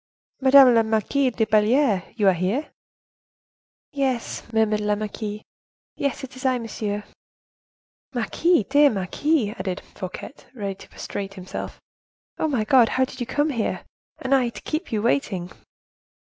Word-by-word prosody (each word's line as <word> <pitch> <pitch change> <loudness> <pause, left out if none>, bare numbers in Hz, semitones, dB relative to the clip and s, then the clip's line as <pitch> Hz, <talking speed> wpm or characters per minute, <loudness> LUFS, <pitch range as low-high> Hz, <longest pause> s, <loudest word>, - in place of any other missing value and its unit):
"Madame 265 -1 +8
la 230 - +5
Marquise 225 +5 +1
de 220 - +2
Belliere, 215 -1 +2
you 215 -3 0
here?" 190 - -1 1.2
"Yes," 265 -4 -1
murmured 220 -1 +2
la 210 0 +1
marquise. 210 0 -5 0.5
"Yes; 280 0 -2
it 260 -1 -8
is 255 - -10
I, 260 -1 +2
monsieur." 210 -3 -4 1.1
"Marquise! 340 - +1
dear 290 +1 +5
marquise!" 215 - 0
added 185 -1 -3
Fouquet, 185 +6 -7 0.2
ready 200 -4 -3
to 190 - -15
prostrate 195 -1 -6
himself. 185 -1 -7 0.6
"Ah! - - +1
my 260 -8 0
God! 240 0 +5
how 260 0 +2
did 255 - -11
you 245 - -3
come 295 +1 +1
here? 230 -5 -2 0.3
And 265 +1 -1
I, 255 -3 +3
to - - -10
keep 315 -1 -3
you 215 -2 -1
waiting!" 200 -8 0
230 Hz, 145 wpm, -24 LUFS, 210-270 Hz, 1.2 s, Madame